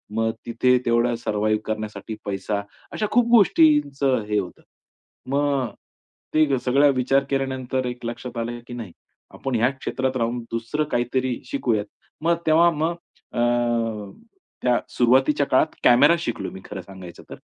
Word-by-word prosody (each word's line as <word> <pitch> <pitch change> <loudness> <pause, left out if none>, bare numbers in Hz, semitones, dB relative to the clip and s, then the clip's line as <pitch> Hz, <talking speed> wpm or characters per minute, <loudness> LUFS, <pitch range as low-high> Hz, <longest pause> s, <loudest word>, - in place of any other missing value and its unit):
मग 110 0 +1
तिथे 125 +2 +3
तेवढा 120 0 +2
सर्व्हायव्ह 110 -1 0
करण्यासाठी 110 0 -5
पैसा 100 +1 -2 0.3
अशा 215 - -1
खूप 245 0 +4
गोष्टींचं 145 - +4
हे 105 - +1
होतं. 90 -3 -7 0.7
मग 140 -3 +1 0.6
ते 155 -3 +3
सगळा 140 +3 +4
विचार 135 +2 +2
केल्यानंतर 130 -1 -1
एक 125 -1 -6
लक्षात 120 +1 -6
आलं 120 +1 -3
की 120 - -8
नाही 115 -7 -7 0.4
आपण 135 -2 -3
ह्या 120 +3 +3
क्षेत्रात 130 -1 -3
राहून 120 +1 -1
दुसरं 115 +7 -1
काहीतरी 125 +1 0
शिकूयात 115 -6 0 0.4
मग 170 +2 +3
तेव्हा 165 +2 +6
मग 160 +2 -1 0.4
अ, - - -2 1.2
त्या 125 -1 +3 0.2
सुरुवातीच्या 135 +4 +3
काळात 130 - +2
कॅमेरा 140 +7 +6
शिकलो 120 -8 -4
मी 95 - -10
खरं 100 -2 -7
सांगायचं 90 -2 -12
तर. - - -7
125 Hz, 140 wpm, -23 LUFS, 115-140 Hz, 1.2 s, तेव्हा